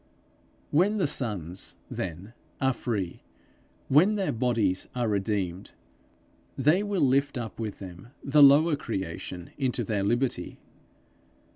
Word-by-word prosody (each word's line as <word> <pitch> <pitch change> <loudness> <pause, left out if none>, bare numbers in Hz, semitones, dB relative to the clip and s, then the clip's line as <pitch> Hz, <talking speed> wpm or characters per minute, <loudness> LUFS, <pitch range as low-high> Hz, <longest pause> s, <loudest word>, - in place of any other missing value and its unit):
When 195 +8 +3
the 190 - +2
sons, 100 - -3
then, 95 +5 -6 0.3
are 130 -1 +2
free, 100 -9 -3 0.7
when 175 +10 +5
their 195 -2 0
bodies 115 -6 0
are 120 -2 0
redeemed, 100 -3 -2 0.8
they 150 +8 +4
will 205 -5 0
lift 140 +1 +2
up 115 -2 -6
with 110 -3 -4
them 90 +1 -10 0.2
the 145 +2 +4
lower 145 +3 +7
creation 95 - -5
into 130 -3 0
their 105 -1 -1
liberty. 120 +6 -1
120 Hz, 120 wpm, -27 LUFS, 100-140 Hz, 0.8 s, lower